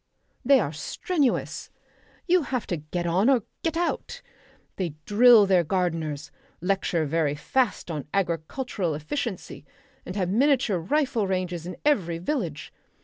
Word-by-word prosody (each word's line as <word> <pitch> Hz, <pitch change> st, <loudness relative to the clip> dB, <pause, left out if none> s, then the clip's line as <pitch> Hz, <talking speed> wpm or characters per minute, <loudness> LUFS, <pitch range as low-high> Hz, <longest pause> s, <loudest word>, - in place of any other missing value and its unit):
They 275 Hz, +1 st, +6 dB
are 155 Hz, -8 st, -2 dB
strenuous. 285 Hz, -, -1 dB, 0.6 s
You 360 Hz, 0 st, +4 dB
have 255 Hz, -5 st, -3 dB
to 175 Hz, -, -2 dB
get 155 Hz, +4 st, -4 dB
on 185 Hz, +8 st, +3 dB
or 255 Hz, -6 st, +3 dB, 0.2 s
get 330 Hz, -1 st, -1 dB
out. 350 Hz, +7 st, -2 dB, 0.5 s
They 175 Hz, -6 st, -3 dB
drill 225 Hz, 0 st, +7 dB
their 185 Hz, -3 st, +4 dB
gardeners, 165 Hz, -4 st, -2 dB, 0.3 s
lecture 180 Hz, -3 st, 0 dB
very 150 Hz, -1 st, 0 dB
fast 240 Hz, -, -1 dB
on 150 Hz, -3 st, -5 dB
agricultural 180 Hz, -, -2 dB
efficiency, 195 Hz, -, -4 dB, 0.4 s
and 180 Hz, -, -7 dB
have 190 Hz, -3 st, 0 dB
miniature 240 Hz, -3 st, +2 dB
rifle 250 Hz, -, 0 dB
ranges 180 Hz, -3 st, -2 dB
in 180 Hz, -, -7 dB
every 185 Hz, -, +2 dB
village. 175 Hz, -, -3 dB
190 Hz, 135 wpm, -26 LUFS, 165-255 Hz, 0.6 s, drill